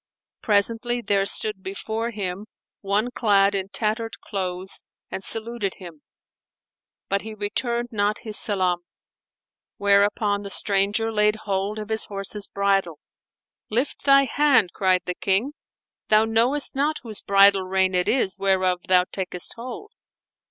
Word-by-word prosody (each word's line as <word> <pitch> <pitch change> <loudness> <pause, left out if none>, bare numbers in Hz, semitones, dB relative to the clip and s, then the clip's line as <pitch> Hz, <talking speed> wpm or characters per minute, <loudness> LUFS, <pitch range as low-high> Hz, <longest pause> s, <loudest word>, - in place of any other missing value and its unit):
Presently, 230 +3 +1
there 200 -2 +1
stood 210 -2 -2
before 220 +4 -4
him 200 -2 -5 0.3
one 210 +4 -1
clad 205 -4 +3
in 195 -1 -2
tattered 225 +2 -3
clothes 185 -1 -5 0.3
and 190 - -5
saluted 225 -2 -2
him, 170 -5 -12 1.1
but 200 0 0
he 220 0 -8
returned 235 +3 -2
not 210 -1 0
his 215 -3 -5
salam; 185 -5 +2 1.0
whereupon 205 0 +2
the 200 - -7
stranger 205 +3 +1
laid 210 0 +2
hold 200 +1 -2
of 215 0 -6
his 220 0 0
horse's 200 0 -1
bridle. 195 -5 0 0.7
"Lift 245 +6 -1
thy 275 0 +6
hand," 270 -10 +3
cried 185 -2 +1
the 180 - -2
King, 200 +9 0 0.6
"thou 215 +1 +5
knowest 235 +6 +1
not 295 +3 0
whose 220 -3 -4
bridle 200 0 +5
rein 190 0 +1
it 180 0 +1
is 230 -7 +1
whereof 185 -2 +1
thou 180 -1 +5
takest 180 -2 -2
hold." 255 - -8
205 Hz, 135 wpm, -23 LUFS, 195-225 Hz, 1.1 s, thy